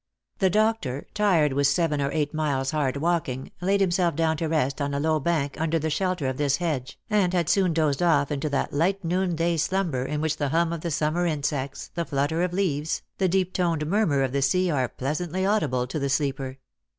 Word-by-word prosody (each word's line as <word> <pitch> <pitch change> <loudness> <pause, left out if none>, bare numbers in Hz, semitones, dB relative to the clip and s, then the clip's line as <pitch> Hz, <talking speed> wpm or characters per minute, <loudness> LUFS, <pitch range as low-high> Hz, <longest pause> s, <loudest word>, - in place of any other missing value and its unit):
The 190 -2 +4
doctor, 210 - 0
tired 175 -9 +3
with 140 +1 +3
seven 150 -2 +1
or 140 - 0
eight 150 -1 -1
miles' 140 -4 0
hard 145 -3 0
walking, 145 -5 -1
laid 195 +2 +2
himself 175 -2 +2
down 160 -1 +1
to 165 - -1
rest 150 -3 0
on 140 0 -1
a - - 0
low 155 +1 +1
bank 150 -2 -1
under 165 0 +1
the 160 0 -2
shelter 185 -2 -1
of 130 -1 -1
this 145 -1 +1
hedge, 140 -7 -3
and 205 -5 +2
had 170 -3 +1
soon 190 -3 +3
dozed 155 -3 +1
off 150 -5 +3
into 145 +1 -1
that 140 - -1
light 185 +7 +1
noon 180 +1 0
day 170 +1 +1
slumber 165 -5 0
in 150 +3 -3
which 155 0 -1
the 145 -2 -1
hum 165 +3 +1
of 165 - -5
the 170 - -3
sum 150 0 0
mer 175 +1 +1
insects, 140 -3 -3
the 170 - -1
flutter 145 +2 -1
of 180 0 0
leaves, 160 -5 -1 0.2
the 190 -2 +2
deep 185 0 +1
toned 165 -4 0
murmur 160 -6 +2
of 130 - -1
the 140 +1 0
sea, 180 +6 +2
are 130 -5 0
pleasantly 175 +7 -2
audible 160 - +1
to 135 +5 -4
the 140 -1 -1
sleeper. 135 -1 -1
155 Hz, 220 wpm, -25 LUFS, 140-175 Hz, 0.2 s, The